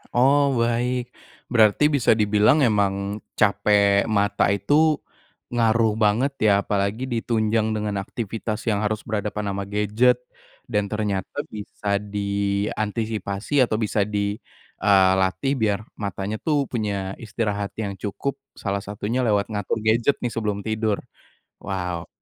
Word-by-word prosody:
Oh, 135 Hz, +4 st, +5 dB, 0.2 s
baik. 120 Hz, +1 st, -1 dB, 0.4 s
Berarti 110 Hz, +3 st, +4 dB
bisa 130 Hz, -, +3 dB
dibilang 105 Hz, +7 st, +4 dB
emang 100 Hz, -2 st, +1 dB, 0.2 s
capek 100 Hz, 0 st, +3 dB
mata 100 Hz, -2 st, +2 dB
itu 150 Hz, -, +3 dB, 0.5 s
ngaruh 115 Hz, -2 st, +3 dB
banget 115 Hz, +7 st, +2 dB, 0.2 s
ya? -, -, +6 dB
Apalagi 100 Hz, +4 st, -1 dB
di 115 Hz, -2 st, 0 dB
tunjang 110 Hz, -1 st, +1 dB
dengan 105 Hz, -1 st, -2 dB
aktivitas 110 Hz, +1 st, -4 dB
yang 105 Hz, -, +1 dB
harus 110 Hz, 0 st, -1 dB
berhadapan 105 Hz, -1 st, -2 dB
ama 100 Hz, 0 st, -3 dB
gadget 105 Hz, +5 st, +2 dB, 0.5 s
dan 105 Hz, -3 st, -1 dB
ternyata 105 Hz, +5 st, -2 dB
bisa 100 Hz, -1 st, -3 dB
diantisipasi 100 Hz, +3 st, -1 dB
atau 110 Hz, -, -1 dB
bisa 110 Hz, -1 st, 0 dB
di, 100 Hz, 0 st, -2 dB, 0.4 s
eee, 95 Hz, -2 st, +5 dB
latih 95 Hz, +9 st, 0 dB
biar 105 Hz, -2 st, +1 dB, 0.2 s
matanya 100 Hz, +1 st, -3 dB
tuh 145 Hz, -3 st, +1 dB
punya 100 Hz, -5 st, -2 dB
istirahat 105 Hz, -2 st, -3 dB
yang 105 Hz, -3 st, -3 dB
cukup, 140 Hz, +7 st, -4 dB, 0.2 s
salah 100 Hz, -1 st, -2 dB
satunya 105 Hz, +5 st, -3 dB
lewat 105 Hz, 0 st, +1 dB
ngatur 105 Hz, +1 st, -2 dB
gadget 115 Hz, +5 st, +2 dB
nih 120 Hz, -, -1 dB
sebelum 105 Hz, -3 st, -2 dB
tidur. 110 Hz, -1 st, 0 dB, 0.6 s
Wow, 90 Hz, -3 st, -4 dB
105 Hz, 125 wpm, -23 LUFS, 100-115 Hz, 0.6 s, ya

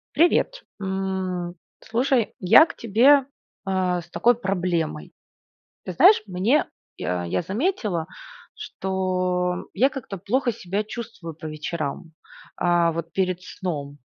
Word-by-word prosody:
Привет! 355 Hz, +9 st, +2 dB, 0.2 s
М, 190 Hz, -2 st, -2 dB, 0.3 s
слушай, 245 Hz, 0 st, 0 dB
я 185 Hz, -, +7 dB
к -, -, -9 dB
тебе, 255 Hz, +6 st, +5 dB, 0.4 s
а, 185 Hz, -2 st, 0 dB
с 170 Hz, -, -19 dB
такой 240 Hz, +6 st, +3 dB
проблемой: 175 Hz, -, -2 dB, 0.7 s
ты 185 Hz, -, -4 dB
знаешь, 365 Hz, -, +6 dB
мне 200 Hz, +10 st, +2 dB, 0.3 s
я 90 Hz, -1 st, -2 dB
я 85 Hz, -, -1 dB
заметила, 210 Hz, -, -1 dB, 0.5 s
что 185 Hz, -1 st, -2 dB
я 250 Hz, +7 st, +3 dB
как-то 255 Hz, -8 st, -7 dB
плохо 240 Hz, +8 st, 0 dB
себя 200 Hz, -1 st, -3 dB
чувствую 215 Hz, -7 st, -7 dB
по 160 Hz, -, -9 dB
вечерам, 155 Hz, +1 st, -4 dB, 0.4 s
а, 175 Hz, -1 st, +3 dB
вот 165 Hz, 0 st, -5 dB
перед 185 Hz, 0 st, 0 dB
сном. 145 Hz, -7 st, -5 dB
185 Hz, 120 wpm, -24 LUFS, 175-230 Hz, 0.7 s, я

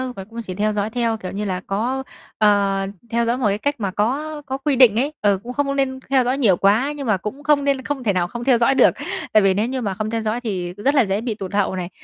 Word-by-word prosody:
và 195 Hz, -, -7 dB
cũng 230 Hz, +1 st, -6 dB
chỉ 185 Hz, -4 st, -6 dB
theo 215 Hz, +1 st, +1 dB
dõi 210 Hz, +1 st, -1 dB
theo, 230 Hz, -1 st, -1 dB
kiểu 185 Hz, -3 st, -7 dB
như 205 Hz, +1 st, -3 dB
là, 185 Hz, -2 st, -2 dB
có 245 Hz, +7 st, -1 dB, 0.3 s
ờ, 200 Hz, -2 st, +2 dB, 0.2 s
theo 235 Hz, 0 st, +1 dB
dõi 235 Hz, +2 st, 0 dB
một 250 Hz, -, -1 dB
cái 200 Hz, 0 st, +1 dB
cách 285 Hz, +6 st, -1 dB
mà 195 Hz, -3 st, -2 dB
có 295 Hz, +9 st, -2 dB
có 265 Hz, 0 st, -3 dB
quy 280 Hz, 0 st, 0 dB
định 245 Hz, -5 st, +6 dB
ấy, 290 Hz, +4 st, -1 dB
ờ, 200 Hz, -2 st, +3 dB
cũng 250 Hz, +1 st, -6 dB
không 285 Hz, 0 st, 0 dB
có 275 Hz, -, -1 dB
nên 265 Hz, -1 st, -1 dB
theo 265 Hz, -2 st, +4 dB
dõi 255 Hz, +3 st, 0 dB
nhiều 200 Hz, -10 st, +3 dB
quá 220 Hz, +9 st, +3 dB
nhưng 280 Hz, -4 st, -5 dB
mà 210 Hz, -3 st, +2 dB
cũng 255 Hz, +10 st, -7 dB
không 285 Hz, -1 st, +3 dB
nên 275 Hz, -2 st, +1 dB
không 280 Hz, -3 st, -4 dB
thể 205 Hz, -3 st, +1 dB
nào 175 Hz, -1 st, 0 dB
không 240 Hz, +5 st, -6 dB
theo 255 Hz, -2 st, +4 dB
dõi 235 Hz, +3 st, +3 dB
được. -, -, +6 dB, 0.4 s
Tại 215 Hz, -2 st, +6 dB
vì 195 Hz, -1 st, +4 dB
nếu 210 Hz, +4 st, 0 dB
như 260 Hz, 0 st, -3 dB
mà 200 Hz, -4 st, -2 dB
không 215 Hz, +2 st, -3 dB
theo 225 Hz, 0 st, -2 dB
dõi 220 Hz, +3 st, -2 dB
thì 180 Hz, -6 st, -3 dB
rất 275 Hz, +8 st, +1 dB
là 255 Hz, -5 st, +5 dB
dễ 195 Hz, +2 st, -1 dB
bị 230 Hz, -3 st, -3 dB
tụt 195 Hz, -1 st, -7 dB
hậu 200 Hz, -2 st, +1 dB
này, 180 Hz, -1 st, -4 dB
225 Hz, 295 wpm, -21 LUFS, 200-265 Hz, 0.4 s, định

